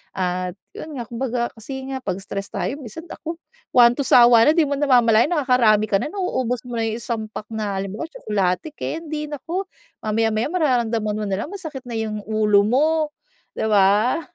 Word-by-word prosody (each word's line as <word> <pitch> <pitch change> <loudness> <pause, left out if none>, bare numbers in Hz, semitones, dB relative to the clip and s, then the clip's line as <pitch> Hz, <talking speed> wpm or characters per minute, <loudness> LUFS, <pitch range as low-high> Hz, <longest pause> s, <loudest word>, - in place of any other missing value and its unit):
at 180 -1 -2 0.2
yun 315 - -7
nga 240 - -4
kumbaga 240 0 -2
kasi 265 +4 -6
nga 270 - -3
pag 190 -1 -2
stress 195 +1 -5
tayo 195 +8 -2
minsan 275 - -9
naku 330 0 -6 0.4
one 240 -1 +7
to 280 - -1
sawa 240 -2 +7
na - - +7
di 330 -3 +4
mo 285 - -1
namamalayan 245 -4 +4
nakakarami 250 -8 +3
ka 195 - +3
na 235 - -3
nauubos 260 - -1
mo 240 - -4
na 225 - 0
yung 225 0 -2
isang 230 -2 -3
pack 215 - -8
na 215 -3 -3
halimbawa 195 +8 -4
tsokolate, 200 - -1
kendi, 310 -2 -4
naku 330 +7 -4 0.4
mamaya-maya 220 +2 0
mararamdaman 230 - +1
mo 215 - -2
nalang 200 +7 -2
masakit 315 -9 -6
na 230 - -3
yung 215 -1 -3
ulo 215 -2 +3
mo, 260 +8 +3 0.7
di - - -1
ba? 210 +6 +3
230 Hz, 180 wpm, -22 LUFS, 210-270 Hz, 0.7 s, one